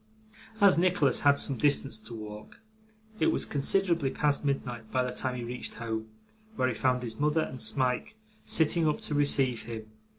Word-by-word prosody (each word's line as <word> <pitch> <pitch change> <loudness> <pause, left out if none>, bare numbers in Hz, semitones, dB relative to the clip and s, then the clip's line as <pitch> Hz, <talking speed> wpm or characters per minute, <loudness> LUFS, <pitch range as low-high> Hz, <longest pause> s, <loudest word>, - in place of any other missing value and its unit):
As 200 -5 +5
Nicholas 175 -7 +2
had 145 0 +3
some 135 -4 +2
distance 135 -4 +2
to 110 +2 -9
walk, 105 -1 -10 0.6
it - - +2
was 330 - +1
considerably 170 0 +1
past 145 +1 0
midnight 125 -5 -4
by 130 -1 +1
the 125 - -3
time 130 0 -2
he 120 - -5
reached 125 +1 -6
home, 110 -1 -5 0.5
where 130 - 0
he 130 - -1
found 125 +2 0
his 110 -2 -6
mother 150 +2 +1
and 130 -4 -5
Smike 130 - +1 0.3
sitting 160 0 +3
up 150 - 0
to - - -2
receive 135 -4 +3
him. 110 -1 -9
130 Hz, 175 wpm, -28 LUFS, 115-150 Hz, 0.6 s, As